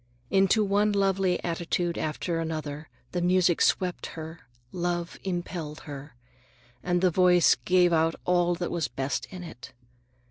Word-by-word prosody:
Into 195 +3 +4
one 205 +1 +2
lovely 195 -2 +1
attitude 170 0 -1
after 165 +2 -2
another 155 -2 -4 0.2
the 175 - -2
music 180 -1 +3
swept 180 -2 +1
her, 160 +1 -7 0.3
love 175 -1 -3
impelled 175 -4 -4
her. 145 -2 -9 0.7
And 175 0 0
the 185 -1 +3
voice 180 0 +5
gave 180 -1 +4
out 165 0 +2
all 175 -1 +2
that 175 0 -4
was 170 -3 -1
best 135 +4 -3
in 185 -2 -9
it. 160 -7 -11
175 Hz, 140 wpm, -27 LUFS, 160-180 Hz, 0.7 s, voice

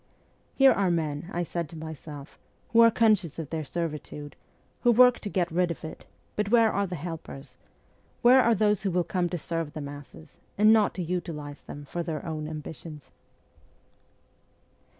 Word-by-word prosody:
' - - -38
Here 270 -1 +7
are 195 -5 +2
men,' 160 -1 -2
I 175 - -1
said 170 -2 -4
to 165 - -11
myself, 155 -2 -9
' - - -38
who 230 - +4
are 230 0 +9
conscious 210 -8 +2
of 160 -4 -6
their 160 -1 -2
servitude, 150 -2 -5 0.5
who 240 - +5
work 250 +1 +6
to 205 - -5
get 180 -3 0
rid 175 +1 +1
of 170 - -6
it; 155 - -9 0.3
but 210 -1 -1
where 230 -1 +5
are 200 0 0
the 180 - -5
helpers? 150 -5 -7 0.7
Where 255 +2 +7
are 235 -2 +3
those 210 -1 +2
who 195 - 0
will 180 -1 +1
come 175 0 -1
to 175 - -3
serve 165 -2 -3
the - - -5
masses 145 - -10 0.2
not 215 0 +5
to 185 - -3
utilize 160 -4 -5
them 145 0 -9
for 175 +5 -4
their 165 0 -4
own 155 -2 -4
ambitions 155 -1 -8
170 Hz, 180 wpm, -27 LUFS, 155-200 Hz, 0.7 s, are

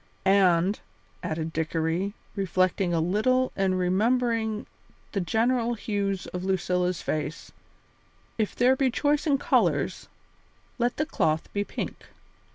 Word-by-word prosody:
"And," 190 0 +4 0.4
added 160 -2 -3
Dickory, 165 +5 -1 0.2
reflecting 185 -1 +1
a 170 - +1
little 220 +10 +2
and 190 -1 +1
remembering 220 +4 +1 0.5
the 200 - -1
general 235 +5 +1
hues 200 -3 -2
of 180 0 -3
Lucilla's 180 -1 0
face, 155 0 -3 0.8
"if 215 -3 -1
there 250 +2 +4
be 265 -1 +2
choice 290 +4 +1
in 285 -2 +4
colours, 285 - +1 0.7
let 240 +1 +1
the 305 - +1
cloth 155 - 0
be 205 - 0
pink." - - -5
195 Hz, 120 wpm, -27 LUFS, 180-235 Hz, 0.8 s, And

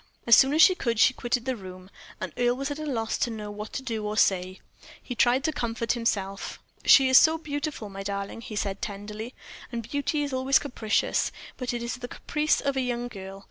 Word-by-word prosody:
As 235 - +8
soon 265 +3 +5
as 320 - +7
she 375 - +7
could 235 -10 -2
she 260 - +6
quitted 245 -1 -2
the 260 -1 -1
room, 185 -2 -11 0.3
and 185 -6 -5
Earle 245 0 +2
was 275 +2 -3
at 290 - -4
a 310 - -4
loss 225 -5 -2
to - - +1
know 210 -2 -6
what 210 +1 -7
to 265 - -4
do 225 -4 -3
or 210 +1 -3
say. 185 -2 +2 0.4
He 250 - -6
tried 245 +2 +3
to 315 - +1
comfort 230 -4 -2
himself. 200 -5 -2 0.3
"She 270 -1 +7
is 260 -1 +8
so 320 0 +4
beautiful, 290 -6 -4
my 195 -1 -8
darling," 200 +2 -4
he 220 - -8
said, 200 -1 -2
tenderly, 210 +3 -6 0.4
"and 230 -2 -5
beauty 290 +1 -1
is 285 -2 -4
always 260 +1 +3
capricious; 230 -6 0 0.3
it 250 -1 -2
is 235 +1 -3
but - - -21
the 245 - -7
caprice 300 +1 0
of 280 -1 -1
a 265 - +1
young 245 -1 -2
girl. 195 -3 -9
235 Hz, 220 wpm, -27 LUFS, 210-265 Hz, 0.4 s, As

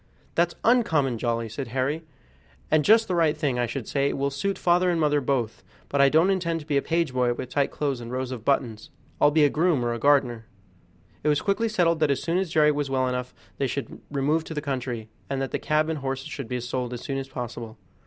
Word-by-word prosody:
"That's 170 0 +1
uncommon 160 - +2
jolly," 115 -1 -1
said 130 +5 -5
Harry, 135 +6 -1 0.7
"and 155 -1 +4
just 220 +6 +5
the 185 - -1
right 165 -3 +2
thing, 140 -5 0
I 120 - +1
should 130 -1 -5
say; 140 0 +1
it - - -3
will 140 +1 0
suit 195 +9 -2
father 180 +1 +3
and 170 -2 +1
mother 150 -2 +2
both; 125 -4 -1 0.3
but 140 - +2
I 140 - +6
don't 165 +6 +4
intend 170 -3 0
to - - -12
be 150 - -1
a 140 - +3
page 165 -4 0
boy 125 -1 +1
with 125 +1 -6
tight 140 0 +1
clothes 140 -4 -2
and 120 0 -7
rows 130 0 -3
of 120 -4 -6
buttons. 115 -5 0 0.3
I'll - - +7
be 150 +1 +3
a 145 - +5
groom 155 -6 +2
or 120 - 0
a 115 - -4
gardener." 125 -5 +2 0.8
It - - -1
was 150 -1 +2
quickly 215 +3 +1
settled 170 -5 +2
that 155 -2 +2
as 140 - 0
soon 170 +2 +1
as 190 -2 -2
Jerry 155 -1 +4
was 145 -1 -2
well 130 -1 +1
enough 125 0 -3 0.3
they 135 - +1
should 140 +2 -5
remove 145 +3 +1
to 160 - -7
the - - 0
country, 125 -6 -4 0.2
and 135 -1 -1
that 135 -1 -2
the - - -1
cab 155 0 +1
and 160 -2 -2
horses 135 +1 -4
should 140 -6 -6
be 125 +2 -2
sold 125 0 -3
as 120 - -6
soon 135 -1 -3
as 135 - -6
possible. 120 -3 -6
140 Hz, 245 wpm, -25 LUFS, 125-160 Hz, 0.8 s, I'll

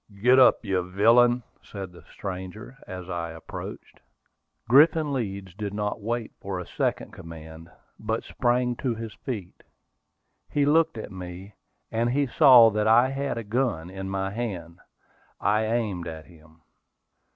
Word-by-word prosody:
"Get 125 +5 +5
up, 125 -2 +5
you 95 -2 +1
villain!" 115 +7 +4 0.2
said 95 -3 -8
the 85 - -14
stranger, 95 +6 -7
as 90 -1 -7
I 85 -2 -3
approached. 80 0 -9 0.7
Griffin 150 +3 +5
Leeds 100 -7 -4
did 100 +1 -5
not 105 +1 -2
wait 115 +2 -3
for 95 -1 -4
a 90 - -6
second - - -2
command, 80 0 -11 0.3
but 110 +1 -2
sprang 125 0 0
to 125 -4 -1
his 115 -1 -7
feet. 105 -9 -7 0.9
He 145 -1 +1
looked 160 -1 +3
at 110 - -7
me, 95 +2 -9 0.4
and 115 +1 +1
he 140 +3 +1
saw 125 -4 +7
that 105 0 0
I 120 +4 +5
had 135 -2 -3
a 115 - -3
gun 105 -7 -1
in 95 0 -6
my 95 0 -2
hand. 95 -7 -5 0.6
I 105 +2 +2
aimed 110 -6 -1
at 80 -2 -7
him. 80 -1 -20
105 Hz, 150 wpm, -26 LUFS, 90-120 Hz, 0.9 s, saw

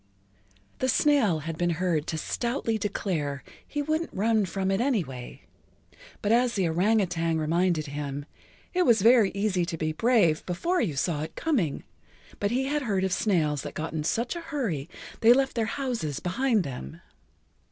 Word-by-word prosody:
The 260 - +1
snail 240 - +3
had 165 +1 -5
been 175 0 +2
heard 170 -4 0
to 160 - -2
stoutly 235 - -2
declare 160 -9 -2 0.2
he 290 -1 -2
wouldn't 315 +3 -1
run 215 +1 +2
from 190 +2 -1
it 195 +3 +1
anyway, 165 - -2 0.8
but 205 - +1
as 240 +1 +3
the 190 -4 +1
orang 190 +7 +2
outang 165 -2 -1
reminded 165 +1 +1
him, 145 -1 -5 0.5
it 365 - +2
was 230 - +4
very 230 -3 +6
easy 200 -3 +1
to 170 -1 -3
be 155 0 -1
brave 175 -4 +3
before 335 - 0
you 165 -11 -1
saw 150 +2 0
it 155 - -6
coming, 230 - 0 0.6
but 200 - +1
he 250 +4 0
had 295 +2 0
heard 200 -7 0
of 190 -1 0
snails 155 -10 +1
that - - -7
got 160 +1 -4
in 155 -2 -2
such 235 - -1
a 340 - -5
hurry 235 - -3 0.3
they 230 +1 +7
left 270 0 +1
their 230 -2 +1
houses 225 - -3
behind 225 +3 +1
them. 125 - -7
190 Hz, 175 wpm, -27 LUFS, 160-240 Hz, 0.8 s, they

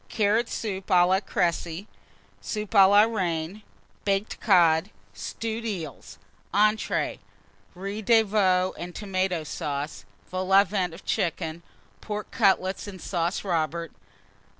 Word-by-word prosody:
Carrot 220 +2 +1
Soup 195 -4 -3
à 175 -1 +5
la 190 +1 +3
Créci. 175 -1 -1 0.6
Soup 210 -1 -4
à 195 -3 +8
la 205 +1 +7
Reine. 185 -3 -2 0.4
Baked 200 +1 -1
Cod. 175 -3 +4 0.2
Stewed 220 - -5
Eels. 175 - -6 0.4
ENTREES. 215 +1 +1 0.6
Riz 200 +4 -5
de 225 +1 +5
Veau 185 -3 +2
and 175 0 -7
Tomata 185 -5 -1
Sauce. 140 -9 -4 0.3
Vol 185 +1 -3
au 195 +1 +8
Vent 185 -4 -2
of 180 - -14
Chicken. 165 -1 -2 0.4
Pork 210 -1 -5
Cutlets 195 -4 +2
and 190 -2 -8
Sauce 175 0 -2
Robert. 165 -3 -1
190 Hz, 125 wpm, -26 LUFS, 170-210 Hz, 0.6 s, à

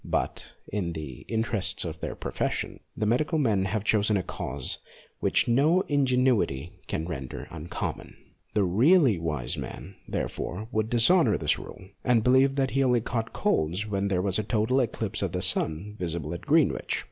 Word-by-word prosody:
But, - - -2
in 90 -5 -2
the 75 -6 -7
interests 110 -6 -1
of 80 -1 -5
their - - -4
profession, - - -3 0.2
the 110 - 0
medical 140 +9 +1
men 110 -10 +2
have 100 +2 -1
chosen 105 -1 +2
a 95 - -1
cause 70 -5 -4 0.4
which - - +2
no 145 +10 +4
ingenuity 125 - +1 0.2
can 80 - -2
render 65 -7 -6
uncommon. 85 +1 -5 0.4
The 105 - +4
really 120 - +4
wise 75 -6 -2
man, 95 - -7
therefore, 105 +5 -3
would 110 -2 0
dishonour 155 +10 +4
this - - +1
rule, 95 - -11
and 120 -3 +3
believe 130 +2 +4
that 135 -2 +1
he 135 +1 +2
only 125 -2 +3
caught 115 0 -3
colds 85 +7 0
when 100 -1 -1
there 90 -2 0
was 100 0 +1
a - - 0
total 110 +4 +1
eclipse 110 -4 -1
of 95 -4 -1
the 90 - -1
sun 90 +2 0
visible 85 -3 -3
at 85 - -6
Greenwich. 155 0 +2
105 Hz, 170 wpm, -27 LUFS, 90-125 Hz, 0.4 s, no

